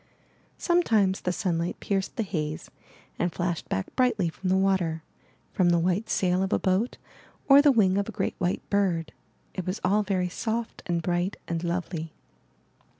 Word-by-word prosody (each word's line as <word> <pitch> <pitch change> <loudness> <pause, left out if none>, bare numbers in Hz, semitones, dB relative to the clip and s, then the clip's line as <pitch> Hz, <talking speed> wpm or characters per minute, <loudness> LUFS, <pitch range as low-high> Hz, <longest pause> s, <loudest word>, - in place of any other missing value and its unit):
Some 350 0 +3
times 200 - +2
the 180 - 0
sunlight 175 -3 -1
pierced 195 -1 -2
the 230 - 0
haze 155 -6 -4 0.5
and 175 0 +1
flashed 175 -1 -3
back 95 - -3
brightly 225 -9 +2
from 185 +3 -4
the 190 - +3
water, 185 -5 +1 0.5
from 180 -2 +3
the 170 - +4
white 185 +6 0
sail 185 0 +1
of 190 - -1
a - - +3
boat, 190 +6 0 0.5
or 275 0 +8
the 290 -1 +6
wing 200 -6 +3
of 200 - -2
a - - -4
great - - -2
white 180 0 -1
bird. 185 -5 +1 0.4
It 185 -2 -5
was 185 +3 -2
all 200 +3 +3
very 190 -3 0
soft 225 +5 -3
and 170 -2 -1
bright 175 +3 -1
and 170 0 -2
lovely. 170 -2 -3
185 Hz, 175 wpm, -27 LUFS, 175-200 Hz, 0.5 s, or